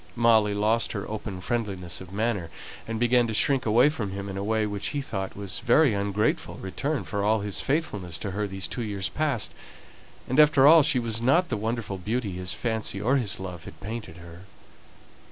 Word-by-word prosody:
Molly 110 -3 +4
lost 110 +2 +1
her 100 -3 -4
open 105 -3 -5
friendliness 95 -6 -3
of 90 -1 -10
manner, 100 -4 -1 0.4
and 115 0 -3
began 120 0 +3
to 110 - -3
shrink 135 +1 +3
away 120 +5 +5
from 110 -10 -4
him 100 0 -5
in 95 - -5
a 100 - -3
way 110 +1 +1
which 105 -1 -3
he 145 - -2
thought 100 -9 -4
was 100 -2 -4
a - - -15
very 130 +1 +5
ungrateful 100 +1 -1
return 140 +10 -3
for 100 -1 -3
all 110 +1 +2
his 100 -1 -2
faithfulness 105 - -1
to 100 +3 -4
her 105 +2 -2
these 95 -1 -4
two - - -4
years 100 -4 -2
past; 145 -8 -1 0.7
and 130 +4 +1
after 150 -3 +6
all 160 +2 +9
she 140 - +3
was 115 -2 -1
not 165 +8 +3
the - - 0
wonderful 110 -2 -3
beauty 110 +3 -2
his 90 0 -4
fancy 110 -2 -2
or 125 +7 +2
his 110 -6 -2
love 90 -3 -7
had - - -11
painted 105 -5 -7
her. 85 0 -12
110 Hz, 205 wpm, -26 LUFS, 100-120 Hz, 0.7 s, all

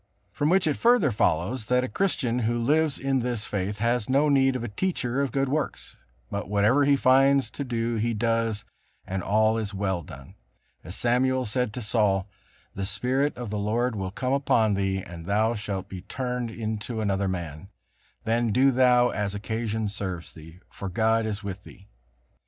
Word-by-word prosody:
From 145 - 0
which 185 +1 +3
it 150 -3 +1
further 230 - +4
follows 105 +4 0
that 125 +2 +2
a - - -1
Christian 125 -10 0
who 120 0 0
lives 150 +5 +2
in 135 -1 0
this 120 -3 -2
faith 100 +1 -3
has 120 +1 0
no 140 +3 +3
need 135 -2 +3
of 125 - -3
a - - -3
teacher 130 - -1
of 140 -3 -1
good 135 +1 0
works, 145 0 -3 0.4
but 100 0 -4
whatever 105 +8 +3
he 140 0 +5
finds 135 +1 +4
to 140 - -4
do 115 -2 -2
he 115 +1 0
does, 115 -1 0 0.4
and 95 0 -3
all 110 +3 +2
is 105 -2 -4
well 95 -3 -1
done; 70 -3 -12 0.5
as 90 +4 -7
Samuel 130 +2 +1
said 120 +2 -1
to 125 - -5
Saul: 100 -3 +1 0.5
"The 100 - -4
Spirit 130 +8 0
of 120 -4 -5
the 105 - -2
Lord 115 +4 0
will 95 -2 -3
come 125 +7 -2
upon 115 -6 +2
thee, 95 -1 0
and 85 -1 -10
thou 110 +3 +2
shalt 100 -3 -4
be 95 -2 -8
turned 125 +3 -3
into 110 0 -4
another 100 -2 0
man; 85 -1 -5 0.5
then 115 0 +1
do 130 +5 +4
thou 125 -1 +4
as 105 -1 -2
occasion 110 +1 -2
serves 95 -4 -5
thee; 80 +3 -13
for 100 - -6
God 110 +3 +1
is 110 0 -4
with 100 -1 -6
thee." 100 +1 -15
115 Hz, 185 wpm, -26 LUFS, 100-130 Hz, 0.5 s, he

